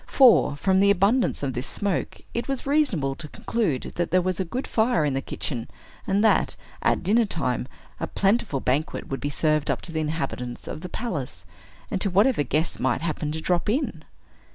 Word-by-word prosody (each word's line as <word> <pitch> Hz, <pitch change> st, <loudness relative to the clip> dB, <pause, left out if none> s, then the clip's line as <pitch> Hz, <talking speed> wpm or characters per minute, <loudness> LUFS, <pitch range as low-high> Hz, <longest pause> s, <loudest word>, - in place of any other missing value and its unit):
For, 250 Hz, -, +5 dB
from 190 Hz, +6 st, +2 dB
the 200 Hz, +1 st, +5 dB
abundance 200 Hz, -, +2 dB
of 135 Hz, -2 st, -1 dB
this 125 Hz, +2 st, -3 dB
smoke, 200 Hz, -3 st, -2 dB
it 235 Hz, -, -2 dB
was 270 Hz, -2 st, -3 dB
reasonable 270 Hz, -, +2 dB
to 150 Hz, +3 st, -8 dB
conclude 170 Hz, -, -2 dB
that 175 Hz, -1 st, 0 dB
there 185 Hz, +3 st, +4 dB
was 185 Hz, 0 st, -1 dB
a -, -, +2 dB
good 245 Hz, +10 st, -4 dB
fire 220 Hz, -8 st, +2 dB
in 145 Hz, -, 0 dB
the 135 Hz, -, -1 dB
kitchen, 125 Hz, -3 st, -4 dB, 0.4 s
and 200 Hz, +2 st, +2 dB
that, 220 Hz, -, +3 dB, 0.3 s
at -, -, +1 dB
dinner 220 Hz, +5 st, +3 dB
time, 130 Hz, -, -2 dB, 0.3 s
a -, -, -2 dB
plentiful 195 Hz, -, +1 dB
banquet 140 Hz, +5 st, -1 dB
would 135 Hz, -, -3 dB
be 145 Hz, -, -1 dB
served 155 Hz, 0 st, +1 dB
up -, -, +1 dB
to 170 Hz, -, -7 dB
the 160 Hz, -, -2 dB
inhabitants 140 Hz, -6 st, -3 dB
of 155 Hz, -, -5 dB
the 180 Hz, -, -6 dB
palace, 135 Hz, -, -4 dB, 0.5 s
and 190 Hz, -, -1 dB
to 200 Hz, -, +2 dB
whatever 205 Hz, -, +3 dB
guests 150 Hz, +4 st, 0 dB
might 130 Hz, +1 st, +1 dB
happen 155 Hz, -2 st, -2 dB
to 160 Hz, +1 st, -4 dB
drop 175 Hz, +3 st, 0 dB
in. 265 Hz, +8 st, -1 dB
170 Hz, 200 wpm, -25 LUFS, 145-205 Hz, 0.5 s, For